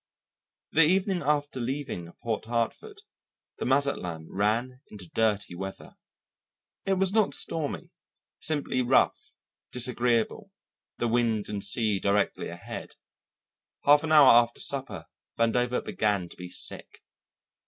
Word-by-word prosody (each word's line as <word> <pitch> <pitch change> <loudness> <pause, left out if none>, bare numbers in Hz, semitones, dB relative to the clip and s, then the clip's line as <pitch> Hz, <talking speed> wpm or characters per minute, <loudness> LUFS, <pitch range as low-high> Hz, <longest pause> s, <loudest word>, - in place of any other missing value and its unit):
The 160 - +4
evening 185 +3 +3
after 145 -2 0
leaving 120 -9 -4
Port 110 -2 -2
Hartford 120 - -3 0.6
the - - -2
Mazatlan 125 - -1
ran 115 +6 -1
into 100 -4 -10
dirty 105 -4 0
weather. 95 +2 -8 0.9
It 195 - +3
was 190 0 +1
not 215 -2 +3
stormy 155 -3 -1 0.5
simply 145 -4 0
rough, 125 +1 +1 0.4
disagreeable, 125 - 0 0.5
the 120 - 0
wind 115 -2 +1
and 100 -2 -4
sea 105 0 +1
directly 100 +1 0
ahead. - - -8 0.9
Half 145 +1 +6
an 160 - -2
hour 150 -4 +8
after 120 0 +4
supper 135 -1 -3 0.3
Vandover 125 +2 +1
began 100 -5 0
to - - -14
be 90 0 -9
sick. - - -9
120 Hz, 120 wpm, -27 LUFS, 105-145 Hz, 0.9 s, hour